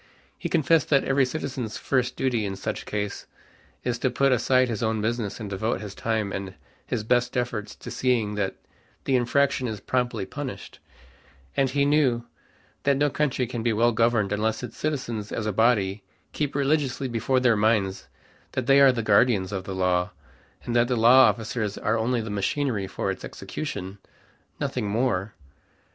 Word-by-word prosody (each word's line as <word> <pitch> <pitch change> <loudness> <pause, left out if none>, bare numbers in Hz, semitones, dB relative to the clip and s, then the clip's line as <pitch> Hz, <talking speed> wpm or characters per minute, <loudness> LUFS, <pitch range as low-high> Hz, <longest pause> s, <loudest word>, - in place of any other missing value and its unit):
He - - -5
confessed 155 0 +3
that 140 -2 +4
every 135 0 +3
citizen's 130 -4 -4
first 130 -2 0
duty 125 -4 0
in 100 -1 -3
such 95 - -5
case 105 -1 -4 0.6
is 120 -1 -1
to 130 - +1
put 135 +2 +2
aside 130 +1 +3
his 115 -4 -3
own 110 -1 0
business 110 -1 -2
and 110 - -5
devote 100 +4 -2
his 105 -2 -7
time 110 -2 -1
and 95 -1 -5 0.3
his 115 -3 -2
best 125 +2 +1
efforts 120 -4 -3
to - - -9
seeing 120 -5 +1
that 105 -2 -2 0.5
the 135 - +1
infraction 130 +1 +2
is 110 -3 -4
promptly 125 -6 -1
punished; 140 +2 -7 0.8
and 135 -1 +2
he 140 +2 +1
knew 135 -5 +2 0.6
that 140 -1 +2
no 145 0 +2
country 135 -4 0
can 120 -1 -4
be 115 0 +1
well 115 +3 +3
governed 115 -3 +2
unless 110 +3 -1
its 120 -2 -7
citizens 120 -9 -3
as 110 - -3
a 110 - -1
body 105 -2 +2 0.3
keep 145 -2 -2
religiously 140 -2 +1
before 125 +2 +1
their 125 -3 +4
minds 105 -3 +1 0.5
that 130 - -2
they 135 +2 +6
are 135 -1 +8
the 115 -3 -2
guardians 105 -2 +3
of 95 -2 -4
the 95 - -5
law, 90 -1 +1 0.5
and 120 - -3
that 120 0 +4
the 125 - 0
law 125 +4 +7
officers 110 -2 -2
are 110 - 0
only 115 +1 0
the 110 -1 -5
machinery 105 +1 -1
for - - -2
its - - -7
execution, 100 -10 -6 0.6
nothing 105 - -2
more. 110 -3 0
120 Hz, 175 wpm, -25 LUFS, 105-130 Hz, 0.8 s, are